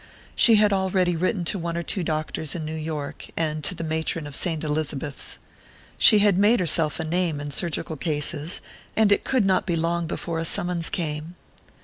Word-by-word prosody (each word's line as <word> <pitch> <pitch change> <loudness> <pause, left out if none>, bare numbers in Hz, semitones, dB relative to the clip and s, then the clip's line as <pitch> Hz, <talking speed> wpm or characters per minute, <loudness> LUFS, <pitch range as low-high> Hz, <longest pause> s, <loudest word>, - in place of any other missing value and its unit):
She 230 - +6
had 210 -1 +4
already 190 -2 +1
written 180 +2 -1
to 195 +4 -1
one 170 0 -3
or 170 - -2
two 185 +2 -2
doctors 155 -2 -2
in 160 -3 -4
New 155 - -4
York, 155 -2 -5
and 155 -2 -1
to 185 - +1
the 165 - -5
matron 160 0 -2
of 145 - -8
Saint 165 -1 -1
Elizabeth's. 150 -2 -3 0.6
She 215 - +8
had 200 -2 +4
made 210 +4 +4
herself 160 -3 +1
a - - -1
name 165 -1 0
in 145 0 -5
surgical 160 0 -2
cases, 150 +2 -2 0.3
and 215 -2 +4
it 205 - +3
could 255 -6 +1
not 190 -1 +2
be 175 - +1
long 170 +1 -1
before 165 0 -3
a - - -1
summons 175 0 +1
came.... 155 0 -3
165 Hz, 195 wpm, -24 LUFS, 155-185 Hz, 0.6 s, She